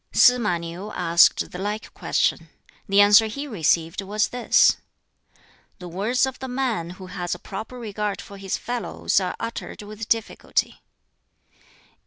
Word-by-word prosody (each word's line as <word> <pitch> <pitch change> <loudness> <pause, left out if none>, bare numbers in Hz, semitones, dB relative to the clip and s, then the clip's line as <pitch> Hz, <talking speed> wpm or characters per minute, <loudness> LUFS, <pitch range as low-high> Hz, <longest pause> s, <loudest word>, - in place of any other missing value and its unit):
Sz 250 0 +6
ma 210 -7 0
Niu 170 +5 -7
asked 170 -1 +4
the 180 - -7
like 210 +2 -4
question. - - 0 0.4
The 200 +1 +6
answer 205 +2 +7
he 280 +7 -5
received 170 - 0
was 210 +2 0
this: 245 -1 +4 1.0
"The 180 - -9
words 210 +10 +1
of 265 -1 -6
the 265 - -5
man 250 -9 -2
who 190 - -9
has 180 -1 -4
a - - -9
proper 215 +7 -8
regard 210 -3 -3
for 200 - -10
his 195 -1 -2
fellows 240 -3 -1
are 185 -2 -3
uttered 230 -2 -6
with 215 +1 -8
difficulty." 225 -1 -1
205 Hz, 150 wpm, -23 LUFS, 185-230 Hz, 1.0 s, answer